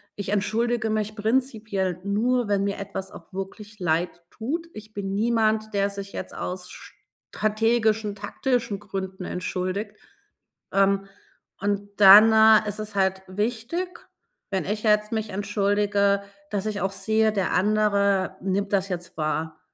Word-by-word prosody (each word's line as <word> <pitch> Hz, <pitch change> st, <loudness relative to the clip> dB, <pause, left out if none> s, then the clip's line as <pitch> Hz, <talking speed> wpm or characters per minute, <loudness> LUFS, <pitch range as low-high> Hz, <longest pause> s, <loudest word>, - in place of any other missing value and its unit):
ich 200 Hz, -2 st, -5 dB
entschuldige 220 Hz, +3 st, 0 dB
mich 215 Hz, 0 st, -1 dB
prinzipiell 215 Hz, -5 st, -1 dB
nur, 225 Hz, +3 st, +1 dB
wenn 200 Hz, -1 st, +2 dB
mir 200 Hz, -, -2 dB
etwas 195 Hz, -1 st, -6 dB
auch 170 Hz, -, -13 dB
wirklich 205 Hz, +3 st, -7 dB
leidtut. 180 Hz, -, -2 dB
Ich 215 Hz, 0 st, -11 dB
bin 195 Hz, -2 st, -4 dB
niemand, 220 Hz, -1 st, +1 dB
der 200 Hz, 0 st, +1 dB
sich 200 Hz, 0 st, -7 dB
jetzt -, -, -7 dB
aus 180 Hz, 0 st, -5 dB, 0.6 s
strategischen, 220 Hz, 0 st, +1 dB
taktischen 225 Hz, +1 st, -2 dB
Gründen 190 Hz, -2 st, -6 dB
entschuldigt. 185 Hz, +3 st, -3 dB, 0.8 s
Ähm, 195 Hz, 0 st, +3 dB, 0.6 s
und 205 Hz, 0 st, -1 dB
dann, 210 Hz, +2 st, +9 dB
äh, 220 Hz, -1 st, +6 dB
ist 205 Hz, -, -5 dB
es 215 Hz, 0 st, -5 dB
halt 190 Hz, -1 st, +1 dB
wichtig, 235 Hz, -, -3 dB, 0.5 s
wenn 190 Hz, -1 st, -1 dB
ich 210 Hz, +3 st, -3 dB
jetzt 210 Hz, -1 st, +3 dB
mich 220 Hz, -1 st, -2 dB
entschuldige, 200 Hz, 0 st, +1 dB, 0.3 s
dass 205 Hz, 0 st, -2 dB
ich 210 Hz, -2 st, -2 dB
auch 195 Hz, -, 0 dB
sehe, 220 Hz, +2 st, +2 dB
der 195 Hz, -3 st, -1 dB
andere 200 Hz, -1 st, +2 dB
nimmt 195 Hz, +2 st, -1 dB
das 195 Hz, 0 st, +1 dB
jetzt 175 Hz, -1 st, -5 dB
wahr. 155 Hz, +1 st, -2 dB
205 Hz, 135 wpm, -25 LUFS, 195-215 Hz, 0.8 s, dann